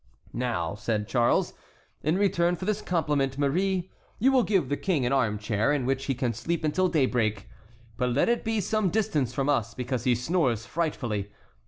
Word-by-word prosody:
"Now," 115 -10 -1
said 105 0 -2
Charles, 120 -2 +2 0.5
"in 155 +4 +1
return 180 -3 +2
for 185 - -6
this 210 0 0
compliment, 145 -7 0
Marie, 180 +6 0 0.3
you 265 +5 +3
will 260 -1 +5
give 195 - +1
the 145 - 0
king 155 -6 0
an 125 - +1
armchair, 105 -1 +1
in 145 -4 0
which 135 +1 -1
he 135 - -1
can 120 -1 -1
sleep 165 +10 -3
until 185 +5 +2
daybreak; 120 - +1 0.5
but 125 -1 +1
let 125 +4 +2
it 235 0 +1
be 225 -2 0
some 215 0 +1
distance 170 - 0
from 135 +1 -1
us, 115 -6 0
because 125 -1 -3
he 125 -1 +4
snores 125 - 0
frightfully. 120 -11 -2
135 Hz, 180 wpm, -27 LUFS, 120-180 Hz, 0.5 s, will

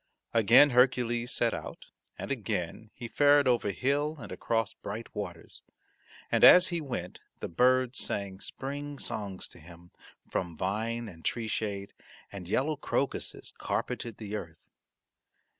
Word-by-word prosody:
Again 115 +6 +7
Hercules 120 -1 +3
set 120 -1 +2
out, - - -7 0.3
and - - -5
again 105 -4 -3
he 120 - -6
fared 145 +2 +4
over 120 -4 +2
hill 145 +8 0
and - - -9
across 115 -1 -1
bright 110 +2 -7
waters, 90 -5 -7 0.7
and - - +2
as 180 0 +9
he 170 -2 -2
went 120 - -5 0.2
the - - -4
birds 125 +6 +2
sang 100 -2 -3
spring 145 +4 -5
songs 100 -7 -4
to - - -15
him 85 +1 -15 0.4
from 85 -3 -3
vine 115 +5 -2
and 80 -5 -12
tree 115 -2 -1
shade, 100 -2 -3 0.4
and 90 -3 -8
yellow 145 +8 +1
crocuses 135 - -3
carpeted 115 -3 -3
the 105 -1 -5
earth. 85 -6 -8
115 Hz, 140 wpm, -30 LUFS, 100-130 Hz, 0.7 s, as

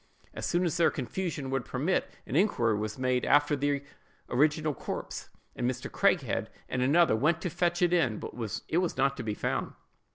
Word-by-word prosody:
As - - -4
soon 175 +1 +1
as 175 0 0
their 170 - +5
confusion 150 0 -3
would 135 -1 0
permit, 150 +9 0 0.2
an - - -4
inquiry 125 - +3
was 105 0 -3
made 130 -1 +1
after 145 +1 +4
the 145 0 0 0.5
original 150 +3 +2
corpse, - - -6 0.3
and 125 - 0
Mr. 130 0 -5
Craighead - - +1 0.2
and 125 - -2
another 150 +1 +4
went 155 +8 +2
to 180 - -2
fetch 175 +1 +1
it 175 0 +3
in, 130 -11 +2
but - - -7 0.3
it 160 - 0
was 180 -2 -1
not 135 +1 +2
to - - -3
be 105 -2 -2
found. - - -2
145 Hz, 190 wpm, -29 LUFS, 125-170 Hz, 0.5 s, their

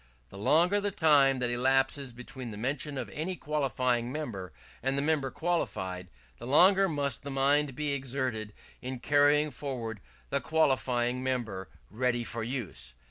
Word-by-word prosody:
The - - -11
longer 175 - +3
the 205 - 0
time 145 -7 +4
that 125 -1 -1
elapses 135 +2 +1
between 125 +1 -8
the 105 - -7
mention 135 +5 -2
of - - -3
any 175 +5 -3
qualifying 130 -6 0
member 115 - -5 0.3
and 135 +2 0
the - - +2
member 145 -3 +1
qualified, 95 - -2 0.3
the - - -7
longer 190 +7 +5
must 140 -5 -1
the 140 - -7
mind 140 0 +2
be 150 0 -1
exerted 130 -5 -2 0.3
in 130 +1 -4
carrying 145 +3 +3
forward 120 -7 -5 0.3
the - - +1
qualifying 125 -5 +1
member 110 -9 -2 0.2
ready 120 +2 0
for 115 0 -5
use. 100 - -4
130 Hz, 150 wpm, -30 LUFS, 120-145 Hz, 0.3 s, longer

